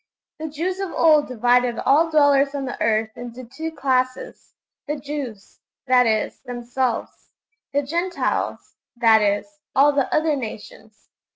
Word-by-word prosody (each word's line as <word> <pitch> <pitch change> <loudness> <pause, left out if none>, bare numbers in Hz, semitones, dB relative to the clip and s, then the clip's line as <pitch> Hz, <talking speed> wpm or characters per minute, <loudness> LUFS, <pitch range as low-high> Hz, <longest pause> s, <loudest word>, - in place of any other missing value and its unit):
The 315 - -4
Jews 340 +5 -3
of 390 -3 -3
old 305 -3 +4
divided 245 0 +2
all 320 +4 +3
dwellers 285 -2 +3
on 275 -1 -3
the 250 - -6
earth 220 0 +1
into 245 +1 -8
two 315 +7 -6
classes: 260 -3 -2 0.3
the 295 - -1
Jews 275 -8 -7 0.3
that 250 -2 +4
is, 220 -1 0
themselves; 245 0 -4 0.4
the 285 +1 0
Gentiles 345 +6 -2 0.2
that 225 -2 +5
is, 210 +9 -1 0.2
all 285 +2 +6
the 280 -2 0
other 310 -1 +2
nations. 220 -3 -9
265 Hz, 135 wpm, -22 LUFS, 240-300 Hz, 0.4 s, all